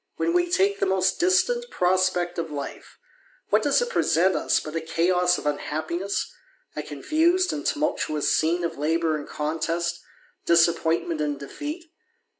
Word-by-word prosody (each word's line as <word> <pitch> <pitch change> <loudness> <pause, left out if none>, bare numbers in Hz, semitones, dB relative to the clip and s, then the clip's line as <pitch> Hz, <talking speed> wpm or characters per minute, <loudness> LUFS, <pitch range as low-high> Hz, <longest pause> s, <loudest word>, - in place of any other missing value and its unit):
When 340 - 0
we 350 0 +2
take 395 +2 +2
the - - +1
most 190 -1 +1
distant 475 +7 +2
prospect 180 - +1
of 165 -1 -3
life, 145 -2 -7 0.5
what - - +3
does - - +2
it 480 - -4
present 180 - +2
us - - +1
but 155 +1 -8
a 165 - -1
chaos 180 +2 +2
of - - -8
unhappiness, 160 +6 -2 0.4
a 150 - -3
confused 320 - +1
and 295 0 -4
tumultuous 295 - 0
scene 170 +3 +1
of 165 -3 -3
labour 160 +1 +1
and 150 -1 -6
contest, 165 +3 -2 0.5
disappointment 170 -1 +2
and 145 -2 -2
defeat? 305 - -7
175 Hz, 150 wpm, -25 LUFS, -, 0.5 s, what